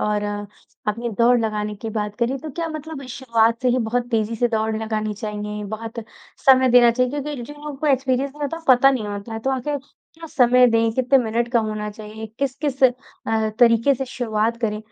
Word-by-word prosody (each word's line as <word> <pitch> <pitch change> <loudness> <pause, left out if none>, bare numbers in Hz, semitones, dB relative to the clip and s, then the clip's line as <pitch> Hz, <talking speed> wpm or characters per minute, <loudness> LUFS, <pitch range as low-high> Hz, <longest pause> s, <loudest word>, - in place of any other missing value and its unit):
और 210 -1 0 0.7
अपनी 230 +3 -2
दौड़ 240 +1 +5
लगाने 210 -1 -2
की 220 +2 -6
बात 210 -1 -3
करी, 245 +2 0
तो 310 +3 -7
क्या 330 +3 -3
मतलब 310 -1 -7
इस 255 - -9
शुरुआत 230 -3 +1
से 250 - +3
ही 250 +1 +2
बहुत 240 +1 -1
तेज़ी 225 -1 0
से 240 +2 +2
दौड़ 220 -1 -1
लगानी 215 -1 -2
चाहिए, 210 0 -5
बहुत 220 +2 -6 0.5
समय 260 -1 +6
देना 240 -1 +7
चाहिए 250 +1 +1
क्योंकि 285 -3 -5
जिन 295 +5 -9
लोगों 295 0 -7
को 305 - -3
एक्सपीरियंस 270 -1 +1
नहीं 295 +2 -10
होता, 310 +3 -2
पता 260 +2 +7
नहीं 235 -6 -2
होता 205 +2 -6
है, 225 - -3
तो 265 +4 -1
आखिर 270 +3 -1
क्या 320 +4 -16
समय 250 -3 +5
दें, 230 -1 +2
कितने 260 +2 +3
मिनट 235 +2 -1
का 235 - +4
होना 215 -1 -3
चाहिए, 215 +1 -9
किस-किस 275 0 -2
अ, 225 -3 0
तरीके 235 +3 +5
से 265 +1 -3
शुरुआत 230 -2 -1
करें, 210 -3 -1
235 Hz, 205 wpm, -22 LUFS, 220-265 Hz, 0.7 s, देना